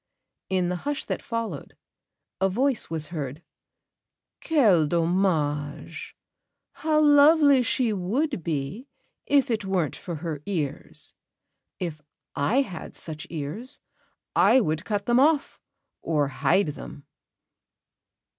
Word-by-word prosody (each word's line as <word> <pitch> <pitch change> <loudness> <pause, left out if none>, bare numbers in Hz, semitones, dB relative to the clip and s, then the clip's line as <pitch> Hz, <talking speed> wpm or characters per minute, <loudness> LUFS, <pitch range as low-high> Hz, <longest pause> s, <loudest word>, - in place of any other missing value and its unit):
In 185 -2 +1
the 180 - -1
hush 290 +8 -3
that - - -3
followed, 230 -10 -5 0.6
a 195 0 +2
voice 255 +5 0
was 160 -2 -3
heard: 150 -2 -5 1.0
"Quel 210 - +4
dommage! 165 -4 -1 0.6
How 310 -1 +1
lovely 290 -2 +6
she 235 -1 +1
would 210 - -1
be, 155 - -3 0.4
if 280 -2 +3
it 220 -2 0
weren't 185 -7 -1
for 175 - -6
her 155 -2 -5
ears. 160 -9 -4 0.6
If 165 -4 -5 0.3
I 220 - +2
had 185 -9 -9
such 155 -2 -6
ears, 170 - -5 0.6
I 265 - +6
would 160 -5 -1
cut 205 -2 -2
them 240 +1 +3
off, 295 +1 +2 0.4
or 150 -4 0
hide 140 +7 +2
them." 145 0 -9
185 Hz, 115 wpm, -26 LUFS, 155-255 Hz, 1.0 s, lovely